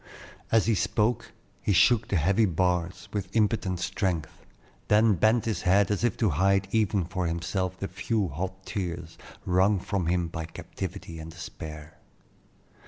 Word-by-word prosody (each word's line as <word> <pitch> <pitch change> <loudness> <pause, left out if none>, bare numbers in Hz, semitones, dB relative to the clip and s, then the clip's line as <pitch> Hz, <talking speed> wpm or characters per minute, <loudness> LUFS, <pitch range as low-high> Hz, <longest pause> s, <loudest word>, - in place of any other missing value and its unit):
As 115 -1 +4
he 115 - +3
spoke, 105 +4 0 0.3
he 100 - +1
shook 105 +5 +4
the - - -1
heavy 95 +7 +3
bars 90 0 -1
with 100 -3 -3
impotent 105 -4 +1
strength, 90 -5 -2 0.4
then 105 +1 +5
bent 110 +5 +3
his 110 -2 -1
head 95 +2 +3
as 105 - -1
if 120 - +1
to 110 -6 +2
hide 95 +5 +2
even 105 -4 +1
from 90 0 -2
himself 90 +3 -2
the 95 - -3
few 110 -2 -1
hot 95 +5 -5
tears 85 -5 -5 0.3
wrung 95 +3 +3
from 95 -2 -2
him 90 0 +1
by 80 0 -5
captivity 85 +1 -7
and 80 +1 -8
despair. 80 -2 -9
95 Hz, 155 wpm, -27 LUFS, 85-105 Hz, 0.4 s, then